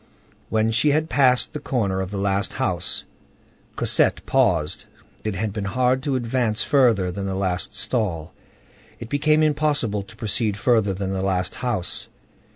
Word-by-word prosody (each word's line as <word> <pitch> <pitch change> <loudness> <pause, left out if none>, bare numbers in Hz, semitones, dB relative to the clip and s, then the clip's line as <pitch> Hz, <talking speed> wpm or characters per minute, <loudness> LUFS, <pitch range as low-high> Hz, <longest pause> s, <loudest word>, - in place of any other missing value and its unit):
When 110 0 +1
she 120 +7 +3
had 155 +2 +1
passed 130 -3 +3
the 150 - -4
corner 100 -9 -1
of 95 - -4
the 100 - -5
last 100 0 0
house, - - -1 0.7
Cosette - - +1
paused. - - +1 0.4
It 110 -2 -2
had 105 +1 -2
been 105 -2 -3
hard 125 +5 +1
to 140 0 -1
advance 115 -3 0
further 115 -10 +3
than 100 +2 -4
the 95 - -2
last 90 -3 -1
stall; 90 -10 -2 0.7
it 115 - -8
became 155 +3 +3
impossible 145 -8 +1
to 110 +3 -14
proceed 105 -1 -1
further 105 -4 +2
than 95 0 -3
the 95 -1 -2
last 95 -1 0
house. 120 -8 -3
110 Hz, 160 wpm, -23 LUFS, 95-130 Hz, 0.7 s, she